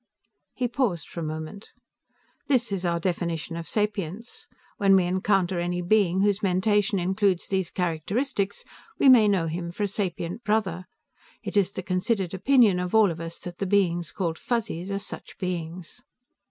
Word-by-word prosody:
He 250 - 0
paused 240 -9 -1
for - - -8
a - - -3
moment. 155 +6 -6 0.7
"This 245 -6 +2
is 185 -2 -1
our 170 0 0
definition 170 -2 -2
of 165 -1 -6
sapience. 210 +1 -3 0.3
When 195 -3 +5
we 190 - +4
encounter 185 0 +1
any 175 +1 -2
being 190 -1 +3
whose 205 0 +2
mentation 200 +2 +2
includes 190 0 +1
these 190 -3 -1
characteristics, 195 - -2 0.3
we 275 - +5
may 235 -5 +7
know 195 -5 +2
him 170 +1 -4
for 205 - -3
a - - +2
sapient 190 +1 -3
brother. 195 -5 0 0.6
It - - -5
is 200 -2 +3
the 190 - -6
considered 185 +1 -1
opinion 215 -2 +4
of 180 +3 -2
all 215 -4 +6
of 165 - -7
us 165 0 -6
that 175 -1 -8
the 195 - -1
beings 175 -4 +1
called 170 -4 -2
Fuzzies 200 -7 -2
are 200 - -1
such 200 - -7
beings." 180 +2 -5
190 Hz, 165 wpm, -26 LUFS, 175-205 Hz, 0.7 s, may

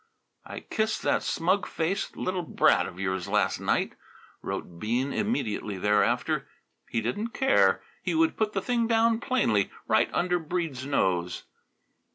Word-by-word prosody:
"I - - -7
kissed 220 0 -1
that - - +2
smug 185 +4 0
faced 170 +5 -2
little 185 0 -1
brat 165 - +3
of 90 - -10
yours 95 -2 -2
last - - +1
night," - - 0 0.5
wrote 85 -1 -5
Bean 120 +7 -1
immediately 110 - -1
thereafter. 105 +2 +1 0.4
He 115 - -1
didn't 205 - -3
care. 265 0 +3 0.2
He - - -1
would 325 0 +3
put 215 -1 0
the 195 - -1
thing 235 -2 +1
down 225 0 +3
plainly, 115 - +1 0.2
right 110 +1 +3
under 180 0 +1
Breede's 155 -5 -3
nose. 90 -10 0
165 Hz, 145 wpm, -27 LUFS, -, 0.5 s, brat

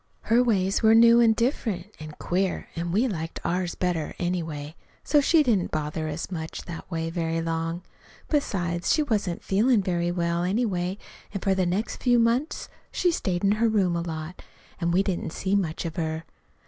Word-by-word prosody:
Her 235 +2 +3
ways 195 -5 +1
were 220 0 +6
new 235 +1 +7
an' 225 -1 +5
different 220 - -1
an' 155 -1 -8
queer, 185 +1 -1
an' 170 +1 -3
we 220 +8 +2
liked 165 -7 -4
ours 180 0 -1
better, 175 -4 -2
anyway. 160 -4 -3 0.3
So 295 - +4
she 310 +2 +4
didn't 215 -9 +1
bother 155 +1 -2
us 155 +5 -5
much 160 -2 -5
that 170 -1 -8
way 165 -2 -2
very 165 -1 -1
long. 165 +1 -2 0.4
Besides, 175 - 0
she 310 - +3
wasn't 205 - -1
feelin' 215 +2 +3
very 175 -1 0
well, 170 -1 0
anyway, 185 -2 0 0.4
an' 195 - -2
for 195 - +2
the 190 -2 +1
next 190 +6 -1
few 245 -1 +4
months 235 +6 +1 0.2
she 355 - +2
stayed 185 - -2
in 200 - +4
her 230 - +4
room 190 -5 +2
a 170 - 0
lot, 160 +1 -6 0.4
an' 170 -1 0
we 180 +3 +3
didn't 180 -4 -3
see 190 +1 -2
much 180 -5 0
of 165 +2 -5
her. 160 -1 -2
180 Hz, 185 wpm, -26 LUFS, 170-220 Hz, 0.4 s, new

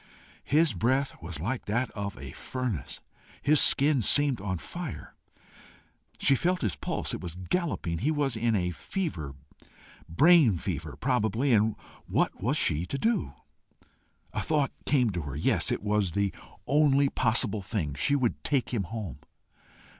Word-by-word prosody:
His 155 -2 +3
breath 130 +8 0
was 80 -1 -6
like 115 - -3
that 120 +4 -1
of 100 -1 -5
a - - -8
furnace. 125 - -5 0.4
His 150 0 +5
skin 140 -1 +5
seemed 140 +1 +3
on 95 -2 -2
fire. 170 - -7 1.0
She 140 - +4
felt 180 +4 0
his 105 -6 0
pulse: - - -3
it - - -4
was 85 -2 -6
galloping. 90 - -2
He 140 - 0
was 145 -5 0
in 115 0 +1
a 90 -3 0
fever 85 - -4 0.7
brain 145 - +5
fever, 80 -4 -5
probably, 125 +1 +1
and 110 0 +3 0.3
what - - 0
was - - +1
she 75 +3 +2
to 140 - -3
do? 215 - 0 1.0
A - - -1
thought 150 -3 0 0.2
came 125 -6 +3
to 90 -2 -3
her. 70 -2 -6
Yes, 75 - +1
it - - -2
was 105 -4 0
the 100 0 0 0.3
only 140 0 +3
possible 115 -5 0
thing. 95 -7 -3
She 75 - +2
would 130 -5 -1
take 130 -4 0
him 105 -6 -1
home. 100 - -6
115 Hz, 155 wpm, -28 LUFS, 95-140 Hz, 1.0 s, His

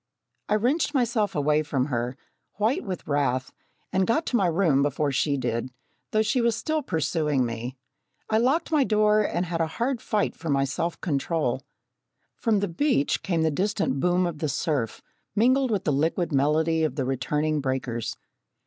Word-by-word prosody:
I 210 - +3
wrenched 280 +8 +1
myself 235 -5 +1
away 150 +1 +2
from 140 -4 -1
her, 125 -1 -2 0.4
white 220 +6 +1
with 185 -4 -5
wrath, 135 -3 0 0.4
and 190 0 +2
got 315 +8 +1
to - - -1
my 195 -6 +3
room 165 -5 +3
before 145 +1 0
she 140 +1 +1
did, 115 -1 -2 0.4
though 215 0 +2
she 220 +4 +1
was 235 -2 +2
still 310 +6 -1
pursuing 155 - 0
me. 120 +3 -5 0.5
I 220 - +2
locked 270 +9 +1
my 300 -3 +4
door 215 -2 +3
and 180 -3 -1
had 165 -1 -2
a 165 - +1
hard 245 0 0
fight 210 -2 0
for 165 - -6
my 140 -1 +2
self 165 +5 -3
control. 160 +1 -1 0.7
From 220 -4 +1
the 200 - 0
beach 175 - +1
came 170 -4 0
the 160 - +2
distant 180 -5 0
boom 180 +3 +2
of 170 -4 -4
the 155 - -1
surf, 140 -7 -2 0.3
mingled 255 +4 +3
with 205 -4 0
the 150 - +1
liquid 165 +4 0
melody 155 +3 +2
of 155 - 0
the 135 - -1
returning 150 +4 0
breakers. 130 -4 -2
165 Hz, 175 wpm, -26 LUFS, 140-215 Hz, 0.7 s, my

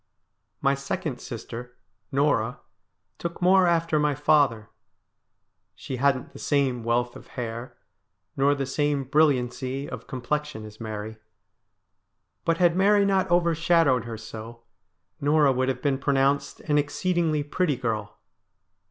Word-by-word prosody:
My 135 - +3
second 140 -1 -4
sister, 120 +1 -8 0.3
Norah, 135 -4 +1 0.6
took 170 0 -5
more 185 0 +5
after 165 -2 +2
my 150 -1 +1
father. 140 -7 +2 1.0
She 130 - -6
hadn't 135 0 +1
the - - -11
same 135 -5 0
wealth 120 +1 0
of - - -12
hair, 120 0 -5 0.6
nor 140 +1 +3
the 140 -1 -2
same 145 +1 0
brilliancy 135 -1 +1
of - - -8
complexion, 130 -2 -3
as 105 0 -12
Mary. 110 0 -5 1.3
But 165 0 +2
had 175 -1 +3
Mary 200 +2 +4
not 195 -2 +2
overshadowed 165 -6 +3
her 115 -1 -6
so, 115 +1 -9 0.6
Norah 145 0 +4
would 130 0 0
have 125 -1 -3
been 140 -2 +1
pronounced 140 0 +1
an 150 -2 +2
exceedingly 160 0 0
pretty 150 +1 0
girl. 110 -5 -3
140 Hz, 125 wpm, -26 LUFS, 125-155 Hz, 1.3 s, more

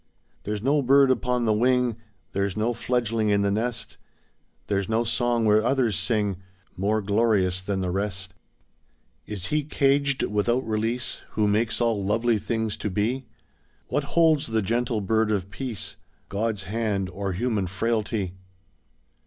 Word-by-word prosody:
There's 105 0 -3
no 145 +3 +3
bird 135 +1 +5
upon 125 -1 0
the 110 - +3
wing, 125 +1 +2 0.4
There's 100 0 -1
no 115 +3 +1
fledgeling 115 -2 0
in 100 -1 +3
the 100 - +1
nest, 110 0 -2 0.7
There's 100 0 -1
no 110 +1 +2
song 120 0 +1
where 105 0 +4
others 120 -4 +2
sing 105 -1 +1 0.4
More 105 +3 0
glorious 100 -3 +2
than 95 0 -2
the 90 -1 -1
rest. 95 -1 -3 0.9
Is 100 -4 -4
he 150 0 +2
caged 140 -1 +2
without 120 +5 +1
release 115 +3 -1
Who 105 -1 +2
makes 110 +3 +1
all 115 -4 +1
lovely 115 +3 +1
things 110 -1 -2
to 105 - -3
be? 115 +6 -1 0.6
What 145 -1 0
holds 160 -3 +4
the 110 -2 0
gentle 115 +1 0
bird 110 +2 +1
of 100 -2 -1
Peace, 120 0 -4 0.3
God's 105 0 -1
hand, 105 -2 -1
or 95 +1 -4
human 105 -1 -1
frailty? 105 -1 -1
110 Hz, 145 wpm, -25 LUFS, 100-120 Hz, 0.9 s, bird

